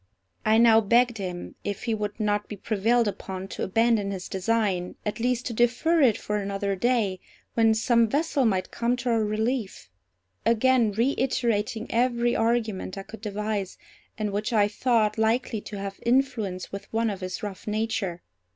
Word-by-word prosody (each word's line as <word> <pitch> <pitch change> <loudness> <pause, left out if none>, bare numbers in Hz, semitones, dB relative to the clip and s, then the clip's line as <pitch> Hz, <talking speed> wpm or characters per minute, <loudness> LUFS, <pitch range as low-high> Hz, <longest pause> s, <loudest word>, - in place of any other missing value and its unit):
I 220 +1 +4
now 225 -1 +6
begged 235 +1 +3
him, 180 -2 -5
if 205 -1 -4
he 230 - 0
would 210 0 -3
not 210 -1 0
be 210 - -5
prevailed 225 +4 +1
upon 190 -1 -5
to - - -6
abandon 225 0 +2
his 190 -2 -5
design, 190 -2 -1
at 210 +2 -3
least 245 +1 0
to 240 - -3
defer 245 +9 +2
it 240 -6 +4
for 210 - -2
another 200 0 -2
day, 210 -3 +1 0.3
when 225 -1 +4
some 230 +1 +3
vessel 290 +2 +1
might 190 -6 0
come 240 +1 0
to 250 0 -3
our 225 -1 +2
relief; 215 - -2 0.5
again 235 0 +3
reiterating 230 -2 0
every 240 0 +2
argument 225 -5 0
I 195 - -5
could 220 +2 -11
devise, 210 -2 -3 0.4
and 210 -2 -2
which 210 +3 -2
I 210 -3 +4
thought 220 0 +1
likely 225 0 +1
to 205 - -8
have 195 0 -6
influence 235 -7 0
with 200 - -8
one 225 0 +1
of 195 -1 -7
his 185 +2 -5
rough 205 -1 -6
nature. 210 -5 -2
220 Hz, 170 wpm, -26 LUFS, 200-235 Hz, 0.5 s, now